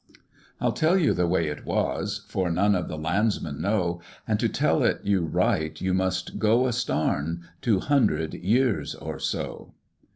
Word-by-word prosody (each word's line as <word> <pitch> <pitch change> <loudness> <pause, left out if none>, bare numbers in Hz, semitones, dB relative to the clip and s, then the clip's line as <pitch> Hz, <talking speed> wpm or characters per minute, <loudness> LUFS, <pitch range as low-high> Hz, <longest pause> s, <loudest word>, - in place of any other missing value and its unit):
"I'll - - +1
tell 165 +4 +2
you 165 -6 +3
the 90 -1 +1
way 85 -1 +1
it 75 -1 -5
was - - -2
(For 95 -2 -1
none 100 +5 +3
of 90 -3 -1
the 80 - -5
landsmen 80 -2 -1
know), 90 -2 0 0.3
And 110 -2 +1
to 115 0 +1
tell - - +1
it - - +1
you 100 -3 +1
right, 80 0 0
you 95 0 0
must 95 0 -1
go 115 +4 +3
a 125 - 0
starn 85 - -1
Two 110 -6 +2
hundred 115 - +1
years 115 +4 +1
or - - -6
so. - - -4
95 Hz, 170 wpm, -26 LUFS, 85-110 Hz, 0.3 s, you